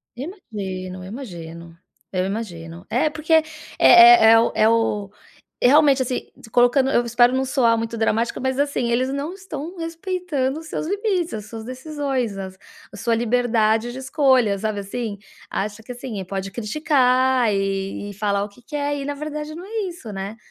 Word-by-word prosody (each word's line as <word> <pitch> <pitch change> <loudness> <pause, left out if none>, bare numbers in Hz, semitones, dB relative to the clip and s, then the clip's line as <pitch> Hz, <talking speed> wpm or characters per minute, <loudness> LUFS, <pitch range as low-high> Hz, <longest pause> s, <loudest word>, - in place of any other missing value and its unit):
Imagino. 195 - -6
Eu - - -9
imagino 170 -7 -9 0.4
eu 185 0 0
imagino. 175 -5 -6
É 310 - +2
porque 315 +1 -2
é 320 -1 +6 0.4
é 355 -9 +9
é 225 - +7
o 230 - +2
é 215 - +4
o 210 -3 0 0.5
realmente, 280 +1 +5
assim, 250 0 -4
se 220 - -14
colocando 250 +3 +4
eu 240 - +2
espero 240 +1 +4
não 265 - +1
soar 255 -3 +2
muito 230 0 -3
dramático, 225 +1 0
mas 260 0 -1
assim, 280 -4 0
eles 255 +2 +1
não 285 +5 -3
estão 355 -3 -7
respeitando 330 -5 -2
os 320 - -11
seus 310 - -4
limites, 390 -3 -1
as 210 -2 -5
suas 225 -1 -8
decisões, 260 -4 -3
as 190 -1 -7 0.4
a - - -9
sua 230 +2 0
liberdade 230 -1 +1
de 250 - -8
escolha, 260 -6 +2
sabe 215 +1 -2
assim? 205 +1 -5 0.3
Acha 210 +2 -4
que 250 - -9
assim, 240 -5 -6
pode 195 +1 -4
criticar 255 0 +2
e 195 +1 -2
e - - -10
falar 200 0 0
o 205 - -6
que 205 +5 -20
quer 290 +2 -2
e 280 - -4
na 290 - -2
verdade 300 +1 -5
não 350 +3 -8
é 425 -2 -3
isso, 300 -11 -9
né? 195 +3 -6
245 Hz, 180 wpm, -22 LUFS, 210-290 Hz, 0.5 s, é